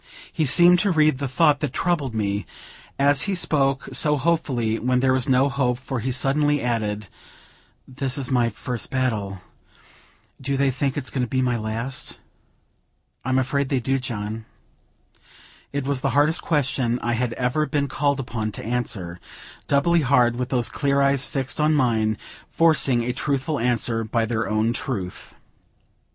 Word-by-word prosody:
He 160 Hz, -, 0 dB
seemed 175 Hz, +5 st, +6 dB
to 205 Hz, -, +1 dB
read 155 Hz, -5 st, +3 dB
the 140 Hz, -, -2 dB
thought 145 Hz, +2 st, +3 dB
that 145 Hz, -4 st, -3 dB
troubled 155 Hz, -8 st, -1 dB
me, 100 Hz, -1 st, -2 dB, 0.5 s
as 140 Hz, 0 st, +3 dB
he 195 Hz, -, 0 dB
spoke 135 Hz, -5 st, +1 dB
so 150 Hz, -1 st, +2 dB
hopefully 130 Hz, -8 st, 0 dB
when 125 Hz, +1 st, +1 dB
there 130 Hz, 0 st, +3 dB
was 130 Hz, -1 st, +1 dB
no 130 Hz, +1 st, +4 dB
hope, 125 Hz, -3 st, 0 dB
for 130 Hz, 0 st, -5 dB
he 130 Hz, +4 st, -2 dB
suddenly 145 Hz, +3 st, +1 dB
added: 105 Hz, -4 st, -2 dB, 0.8 s
"This 130 Hz, 0 st, -3 dB
is 135 Hz, -1 st, -4 dB
my 120 Hz, -2 st, +2 dB
first 120 Hz, +2 st, -4 dB
battle; 105 Hz, -8 st, -2 dB, 1.0 s
do 140 Hz, +1 st, -1 dB
they 140 Hz, 0 st, +2 dB
think 135 Hz, +2 st, -2 dB
it's 130 Hz, -5 st, -3 dB
going 130 Hz, -, -1 dB
to 125 Hz, -, -1 dB
be 130 Hz, -, -1 dB
my 125 Hz, -1 st, +1 dB
last?" 115 Hz, +4 st, -4 dB, 1.1 s
"I'm 130 Hz, +1 st, 0 dB
afraid 135 Hz, +1 st, 0 dB
they 135 Hz, -, +1 dB
do, 135 Hz, +2 st, 0 dB
John." 110 Hz, -3 st, -5 dB, 1.3 s
It 140 Hz, -1 st, -3 dB
was 140 Hz, -2 st, -1 dB
the 135 Hz, -, 0 dB
hardest 155 Hz, +3 st, +3 dB
question 130 Hz, -6 st, 0 dB
I 120 Hz, -, 0 dB
had 115 Hz, 0 st, -1 dB
ever 125 Hz, +6 st, 0 dB
been 145 Hz, -2 st, 0 dB
called 140 Hz, +1 st, 0 dB
upon 110 Hz, -4 st, -3 dB
to -, -, -7 dB
answer; 105 Hz, -7 st, -3 dB, 0.5 s
doubly 165 Hz, +4 st, +3 dB
hard 125 Hz, -4 st, +3 dB
with 125 Hz, +1 st, -3 dB
those 125 Hz, -3 st, +1 dB
clear 140 Hz, -1 st, 0 dB
eyes 140 Hz, 0 st, +3 dB
fixed 135 Hz, 0 st, -2 dB
on 155 Hz, +1 st, +3 dB
mine, 110 Hz, -6 st, +1 dB, 0.3 s
forcing 145 Hz, -7 st, +3 dB
a 125 Hz, +1 st, -2 dB
truthful 140 Hz, +2 st, -1 dB
answer 115 Hz, -1 st, 0 dB
by 115 Hz, +1 st, 0 dB
their 110 Hz, -2 st, -2 dB
own 110 Hz, +2 st, +1 dB
truth. 100 Hz, -8 st, -5 dB
130 Hz, 165 wpm, -23 LUFS, 120-140 Hz, 1.3 s, seemed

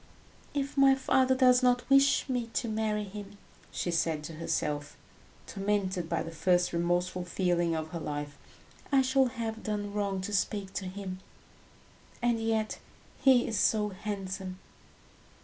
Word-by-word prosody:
"If 280 Hz, 0 st, -2 dB
my 270 Hz, -1 st, +6 dB
father 260 Hz, -1 st, +3 dB
does 255 Hz, -1 st, +5 dB
not 245 Hz, -1 st, +2 dB
wish 275 Hz, +1 st, +4 dB
me 245 Hz, -3 st, -1 dB
to 240 Hz, -, -1 dB
marry 215 Hz, -1 st, -1 dB
him," 205 Hz, 0 st, -9 dB, 0.3 s
she 175 Hz, -, -2 dB
said 165 Hz, -2 st, 0 dB
to 165 Hz, -, -7 dB
herself, 150 Hz, -2 st, -2 dB, 0.5 s
tormented 195 Hz, -4 st, -1 dB
by 170 Hz, -, 0 dB
the 165 Hz, -, -7 dB
first 175 Hz, +2 st, +2 dB
remorseful 175 Hz, +2 st, 0 dB
feeling 175 Hz, -2 st, 0 dB
of 160 Hz, 0 st, -3 dB
her 170 Hz, -, -5 dB
life. 145 Hz, -1 st, -4 dB, 0.6 s
"I 270 Hz, -1 st, +5 dB
shall 265 Hz, +1 st, +3 dB
have 225 Hz, -2 st, -4 dB
done 205 Hz, -1 st, -3 dB
wrong 200 Hz, -2 st, -1 dB
to 205 Hz, +2 st, -5 dB
speak 195 Hz, 0 st, -1 dB
to 190 Hz, -, -3 dB
him. 185 Hz, 0 st, -6 dB, 1.0 s
And 240 Hz, -1 st, +1 dB
yet 225 Hz, -1 st, -1 dB, 0.4 s
he 260 Hz, -3 st, +5 dB
is 220 Hz, -4 st, -1 dB
so 210 Hz, -1 st, +2 dB
handsome!" 190 Hz, -2 st, -5 dB
205 Hz, 150 wpm, -30 LUFS, 175-235 Hz, 1.0 s, my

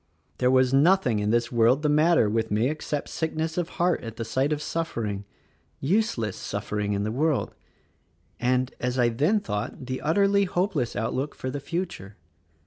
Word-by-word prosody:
There 125 Hz, -, +3 dB
was 130 Hz, 0 st, +4 dB
nothing 140 Hz, -, +4 dB
in 105 Hz, 0 st, 0 dB
this 120 Hz, +1 st, +1 dB
world 120 Hz, +5 st, +3 dB
the -, -, +3 dB
matter 150 Hz, -3 st, +4 dB
with 110 Hz, +1 st, 0 dB
me 110 Hz, +5 st, +1 dB
except 150 Hz, -1 st, -4 dB
sickness 160 Hz, 0 st, -2 dB
of 175 Hz, -1 st, -1 dB
heart 175 Hz, 0 st, +2 dB
at 115 Hz, -1 st, -7 dB
the 115 Hz, -, -4 dB
sight 130 Hz, +6 st, 0 dB
of 150 Hz, -, 0 dB
suffering, 115 Hz, -12 st, -3 dB, 0.5 s
useless 140 Hz, -, 0 dB
suffering 105 Hz, 0 st, -3 dB
in 100 Hz, 0 st, -1 dB
the 105 Hz, -, -2 dB
world, 145 Hz, +3 st, 0 dB, 0.9 s
and, 125 Hz, +1 st, +1 dB
as 125 Hz, +1 st, -2 dB
I 120 Hz, -1 st, +4 dB
then 150 Hz, -, +2 dB
thought, 125 Hz, -, -4 dB
the 130 Hz, +1 st, -4 dB
utterly 200 Hz, +5 st, +3 dB
hopeless 180 Hz, -, -1 dB
outlook 130 Hz, +6 st, -2 dB
for 130 Hz, -, -4 dB
the 145 Hz, -, -4 dB
future. 145 Hz, -, -5 dB
130 Hz, 170 wpm, -26 LUFS, 115-160 Hz, 0.9 s, was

